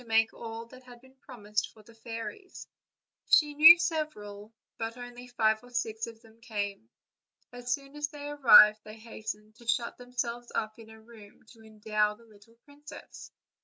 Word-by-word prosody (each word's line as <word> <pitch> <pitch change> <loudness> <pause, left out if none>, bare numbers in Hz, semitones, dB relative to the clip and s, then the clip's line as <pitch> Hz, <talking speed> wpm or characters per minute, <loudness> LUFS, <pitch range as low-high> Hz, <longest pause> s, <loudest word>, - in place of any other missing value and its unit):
make 225 0 +2
all 230 0 -8
that 255 +2 -15
had 245 -1 -15
been 260 +1 -21
promised 210 -5 -4
for 215 - -19
the 230 - -18
fairies; 230 - -8 0.6
she 295 -1 +4
knew 320 +4 +10
several, 220 -12 -4 0.3
but 225 +1 -4
only 245 0 -10
five 220 -2 +1
or 245 - -15
six 225 -2 -3
of 230 -1 -11
them 225 0 -21
came. 210 -2 -5 0.6
As 245 0 -6
soon 275 +2 -4
as 295 0 -2
they 290 -1 -9
arrived 220 -7 +7
they 215 +1 -11
hastened 215 -1 -8
to 235 - -17
shut 235 +1 -1
themselves 240 -1 -5
up 215 +1 -3
in 220 -1 -13
a 220 0 -14
room 220 -2 -17
to 225 - -18
endow 215 -1 -1
the 230 +2 -21
little 215 +1 -21
princess. 290 +1 -13
230 Hz, 170 wpm, -29 LUFS, 220-250 Hz, 0.6 s, knew